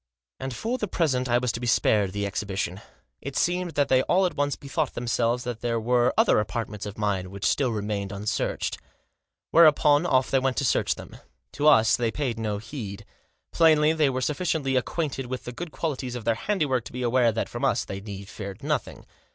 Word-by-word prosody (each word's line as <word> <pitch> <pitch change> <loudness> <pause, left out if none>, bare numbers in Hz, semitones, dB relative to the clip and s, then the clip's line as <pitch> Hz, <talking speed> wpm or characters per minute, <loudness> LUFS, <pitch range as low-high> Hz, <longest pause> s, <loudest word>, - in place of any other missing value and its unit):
And 130 0 -4
for 240 - -2
the 210 - -1
present 130 -8 0
I 120 - +4
was 125 -1 0
to 115 - -5
be 120 - -4
spared 105 -4 +3
the 100 +1 -2
exhibi 100 0 -4
tion. 95 +1 -2 0.4
It 140 -1 -5
seemed 180 -1 0
that 145 -1 +2
they 130 0 +4
all 185 +7 +2
at 180 - -1
once 145 0 0
bethought 140 -2 -3
them 120 - -4
selves 120 +1 +1
that 120 -2 -5
there 115 -1 0
were 120 +2 +2
other - - +4
apartments 105 -1 -4
of 100 - -8
mine 100 -3 -1
which 100 +1 -6
still 135 -3 +2
remained 105 -2 -3
unsearched. 100 +1 -2 0.7
Whereupon 155 -1 +5
off 130 -5 +2
they 135 - +4
went 130 -1 -1
to 140 - +1
search - - +1
them. - - -11 0.3
To 145 +1 0
us 110 -7 +6
they 120 -2 0
paid 120 -3 -3
no 105 -2 -2
need. 105 -7 -6 0.5
Plainly 155 -1 +5
they 155 -3 +2
were 130 -1 -2
sufficiently 150 -2 -1
acquainted 135 0 -2
with 130 0 -5
the 125 - -6
good 165 +6 -7
qualities 135 -7 -3
of 120 -3 -6
their 115 - +3
handiwork 135 - 0
to - - -9
be 125 0 -4
aware 120 -1 +3
that 115 - -2
from - - -7
us - - +1
they 95 0 -6
need 100 -1 -8
fear 100 -2 -7
nothing. 145 -3 -3
125 Hz, 210 wpm, -26 LUFS, 110-145 Hz, 0.7 s, us